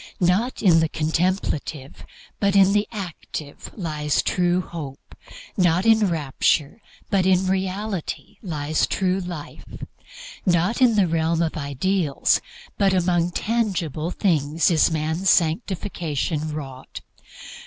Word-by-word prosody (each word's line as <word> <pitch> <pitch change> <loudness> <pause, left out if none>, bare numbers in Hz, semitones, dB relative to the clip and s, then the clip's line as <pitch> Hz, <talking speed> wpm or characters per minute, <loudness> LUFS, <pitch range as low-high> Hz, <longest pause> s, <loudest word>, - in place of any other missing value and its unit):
Not 190 +8 +1
in 170 -5 +6
the 160 -1 +1
contemplative, 160 -4 -2 0.3
but 200 -1 +1
in 195 0 +6
the 210 0 +2
active, 175 -7 -7
lies 150 -5 -1
true 180 0 +1
hope; 150 -6 -9 0.4
not 180 0 +2
in 220 -2 +5
rapture, 150 - 0 0.3
but 190 -2 +2
in 190 0 +3
reality, 190 0 -3
lies 155 -5 -1
true 185 0 0
life; 175 -5 -7 0.8
not 180 +6 +1
in 240 -3 +5
the 200 -3 +4
realm 165 0 +1
of 160 - -2
ideals, 150 +2 0 0.4
but 195 -2 +3
among 175 -1 +2
tangible 180 - -1
things, 160 -4 +1
is 165 0 +4
man's 160 +4 0
sanctification 160 - 0
wrought. 135 -3 -8
175 Hz, 115 wpm, -23 LUFS, 155-190 Hz, 0.8 s, in